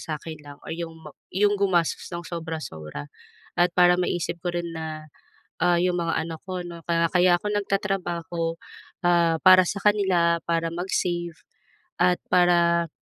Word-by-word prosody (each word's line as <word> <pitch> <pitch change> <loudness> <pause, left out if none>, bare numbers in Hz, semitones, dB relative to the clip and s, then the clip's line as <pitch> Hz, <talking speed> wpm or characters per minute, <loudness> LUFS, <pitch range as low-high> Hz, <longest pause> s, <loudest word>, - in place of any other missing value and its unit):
sa 155 -2 -4
akin 160 -2 -8
lang, 145 -1 -11
or - - -6
'yong 165 -1 -5
ma...'yong 205 +7 -1
gumastos 175 -5 +1
ng 170 0 -5
sobra-sobra 155 - -6 0.5
at 175 0 +4
para 180 0 +6
maisip 175 -1 -1
ko 175 -1 -2
rin 170 0 -3
na, 155 -1 -6 0.5
ah, 175 0 +3
'yong 180 0 +1
mga 165 -1 -1
anak 160 -1 -7
ko, 185 -1 -4
'no, 170 -1 -9
ka 170 0 +2
kaya 180 -1 +5
ako 210 - -5
nag-tatrabaho, 175 -5 -2 0.5
ah, 170 -2 +3
para 185 0 +8
sa 200 - -3
kanila, 185 -5 +3
para 165 0 0
mag-save 175 -1 -2 0.7
at 180 -1 +4
para, 170 -1 +4
170 Hz, 150 wpm, -25 LUFS, 165-180 Hz, 0.7 s, para